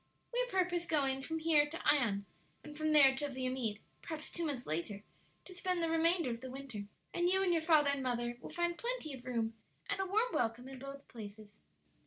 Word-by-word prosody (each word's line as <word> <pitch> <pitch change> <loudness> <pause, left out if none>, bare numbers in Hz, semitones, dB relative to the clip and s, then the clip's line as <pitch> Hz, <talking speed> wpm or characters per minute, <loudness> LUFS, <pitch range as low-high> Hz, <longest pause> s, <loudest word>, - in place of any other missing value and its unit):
"We - - +2
purpose 360 -5 0
going 270 -3 +2
from 320 +4 -3
here 315 -2 +4
to 330 +3 -6
Ion, 215 -9 +3 0.4
and 300 0 -9
from 310 0 0
there 280 -3 +8
to 290 +1 -1
Viamede, 255 -5 -2 0.2
perhaps 315 -2 -6
two 340 - -3
months 280 -6 -2
later, 170 +6 -3 0.4
to 370 - -10
spend 365 -1 0
the 330 - +1
remainder 330 -3 +3
of 230 0 -5
the 260 - -6
winter. 255 -6 -6 0.3
And 350 0 +2
you 380 +1 +3
and 360 -2 +3
your 330 - +2
father 310 -3 +5
and 280 -1 -1
mother 240 -2 -1
will - - -7
find 345 -1 -1
plenty 470 - -2
of 260 -1 -9
room 230 -3 -1 0.3
and 405 - -1
a 385 - 0
warm 440 +6 +2
welcome 235 +2 0
in 265 -1 -8
both 275 +1 -8
places." 210 -2 -10
285 Hz, 210 wpm, -35 LUFS, 245-340 Hz, 0.4 s, there